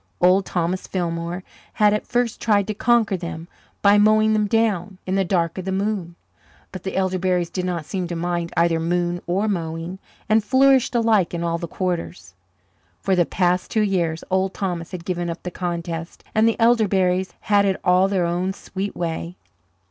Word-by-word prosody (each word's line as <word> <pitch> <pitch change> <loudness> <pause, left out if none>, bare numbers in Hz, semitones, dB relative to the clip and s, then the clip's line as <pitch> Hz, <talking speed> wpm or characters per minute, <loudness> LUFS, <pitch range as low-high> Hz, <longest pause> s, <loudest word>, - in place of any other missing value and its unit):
Old 185 +2 +4
Thomas 180 +1 -2
Fillmore 170 0 -3 0.3
had 210 -1 +4
at 210 - -2
first 240 -2 -1
tried 205 -3 +3
to 215 - -3
conquer 225 -1 +2
them 170 -2 -6 0.4
by 205 0 +6
mowing 215 +1 +4
them 210 -1 +2
down 205 -4 0
"in 185 - -2
the 195 0 +2
dark 175 -1 0
of 185 - -6
the 190 - -2
moon." 190 -3 -2 0.6
But 185 - -7
the 190 - -5
elderberries 185 -2 0
did 185 -1 -2
not 175 -4 -3
seem 180 +2 -3
to 170 - -4
mind 170 0 -2
either 170 -1 +3
moon 175 +1 -1
or 190 +5 0
mowing, 170 -1 -3 0.3
and 215 0 +3
flourished 260 +2 +4
alike 220 -7 +2
in 170 - -3
all 170 0 -1
the 170 - -4
quarters. 175 - -4 0.7
For 190 - +1
the 175 -2 +2
past 180 0 +1
two 220 - +1
years 170 -5 0
Old 190 +1 +1
Thomas 175 -4 -3
had 175 -3 -7
given 175 -2 -2
up 170 - -6
the 180 - -5
contest, 170 -2 -5
and 220 +1 +4
the 230 - 0
elderberries 190 -6 +2
had 205 -1 +3
it 195 -1 0
all 180 +1 +4
their 190 -3 +1
own 175 +3 -1
sweet 195 +1 -5
way. 170 0 -4
185 Hz, 185 wpm, -22 LUFS, 170-205 Hz, 0.7 s, by